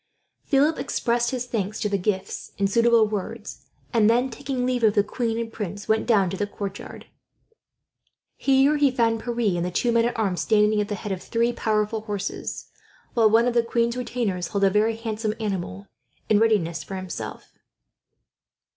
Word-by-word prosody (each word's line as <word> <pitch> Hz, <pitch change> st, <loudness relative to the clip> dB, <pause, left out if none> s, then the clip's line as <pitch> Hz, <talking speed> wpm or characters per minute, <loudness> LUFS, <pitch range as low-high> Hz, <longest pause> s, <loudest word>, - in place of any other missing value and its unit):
Philip 295 Hz, +3 st, +2 dB
expressed 235 Hz, 0 st, 0 dB
his 250 Hz, -2 st, -3 dB
thanks 215 Hz, -3 st, -3 dB
for 215 Hz, -, 0 dB
the 200 Hz, -1 st, 0 dB
gifts 190 Hz, 0 st, -3 dB
in 200 Hz, -, +2 dB
suitable 230 Hz, +2 st, +4 dB
words; 215 Hz, +1 st, -6 dB, 0.3 s
and 220 Hz, -2 st, +4 dB
then, 245 Hz, +3 st, +2 dB
taking 250 Hz, +1 st, -3 dB
leave 250 Hz, -1 st, 0 dB
of 215 Hz, -2 st, +4 dB
the 205 Hz, -, +4 dB
queen 230 Hz, +1 st, -2 dB
and 230 Hz, -1 st, -4 dB
prince, 205 Hz, -1 st, -5 dB
went 220 Hz, 0 st, +1 dB
down 200 Hz, -6 st, +3 dB
to 195 Hz, -, -4 dB
the 205 Hz, -, -1 dB
courtyard. 200 Hz, -1 st, -7 dB, 1.3 s
Here 275 Hz, +2 st, +3 dB
he 290 Hz, -1 st, +4 dB
found 230 Hz, -3 st, +1 dB
Pierre 235 Hz, -6 st, 0 dB
and 170 Hz, -, -1 dB
the 180 Hz, -, -1 dB
two 235 Hz, +7 st, 0 dB
men 230 Hz, 0 st, +3 dB
at 240 Hz, -, -2 dB
arms, 195 Hz, -5 st, 0 dB
standing 210 Hz, -1 st, +3 dB
at 205 Hz, -, -2 dB
the 205 Hz, -, -3 dB
head 200 Hz, +1 st, -6 dB
of 185 Hz, -1 st, -3 dB
three 235 Hz, +1 st, 0 dB
powerful 215 Hz, 0 st, 0 dB
horses; 205 Hz, -2 st, -5 dB, 0.4 s
while 225 Hz, -3 st, +4 dB
one 225 Hz, +2 st, +4 dB
of 245 Hz, -, +1 dB
the 240 Hz, -, +4 dB
queen's 235 Hz, 0 st, 0 dB
retainers 230 Hz, -8 st, -2 dB
held 200 Hz, +2 st, -2 dB
a 195 Hz, -, +5 dB
very 215 Hz, +3 st, +2 dB
handsome 220 Hz, -1 st, -3 dB
animal 175 Hz, -, -4 dB, 0.4 s
in 210 Hz, -, +5 dB
readiness 205 Hz, -7 st, +2 dB
for 195 Hz, -, -7 dB
himself. 185 Hz, -2 st, -7 dB
220 Hz, 180 wpm, -24 LUFS, 205-235 Hz, 1.3 s, a